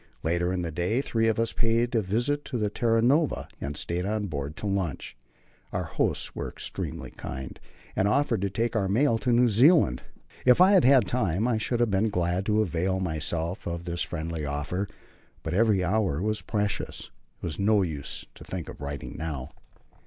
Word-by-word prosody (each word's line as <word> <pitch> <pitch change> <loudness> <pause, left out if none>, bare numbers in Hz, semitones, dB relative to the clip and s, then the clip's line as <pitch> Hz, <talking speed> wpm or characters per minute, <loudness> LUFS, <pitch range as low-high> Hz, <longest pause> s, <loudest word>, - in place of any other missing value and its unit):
Later 85 +2 +1
in 90 -1 -1
the 85 - -3
day 90 - 0
three 115 -4 +1
of 115 0 +1
us 115 0 0
paid 115 +1 +1
a 115 - +3
visit 120 +9 0
to 125 - -3
the 105 -2 0
Terra 115 0 +2
Nova, 145 +5 +2
and 70 +1 -4
stayed 85 +3 -2
on 105 +1 -1
board 70 -4 -4
to - - -6
lunch. 95 -11 -2 0.6
Our - - -1
hosts - - -1
were - - -3
extremely - - -5
kind, 65 0 -7 0.4
and 95 - +2
offered 125 -2 +2
to 100 - 0
take 115 +4 -1
our 100 -3 +1
mail 115 +2 +3
to 125 - 0
New 120 +1 +5
Zealand. 120 - +5 0.4
If 125 +3 +6
I 185 +2 +7
had 190 -8 +6
had 130 -4 +6
time, 105 -2 0
I 115 -3 +1
should 120 +2 -1
have 120 -3 +2
been 100 +3 +2
glad 90 0 0
to 110 0 +3
avail 95 +1 0
myself 85 +1 -2
of 85 0 -3
this 85 0 -3
friendly 80 -1 -3
offer, 75 +7 -2 0.6
but 80 - -3
every 105 -1 +3
hour 95 -5 +1
was 105 +3 -1
precious. 105 -2 -3 0.3
It - - -25
was 85 +1 -4
no 100 0 +4
use 75 -6 -4
to - - -13
think - - -5
of - - -10
writing 70 -1 -5
now. 75 -4 -4
100 Hz, 195 wpm, -27 LUFS, 85-115 Hz, 0.6 s, I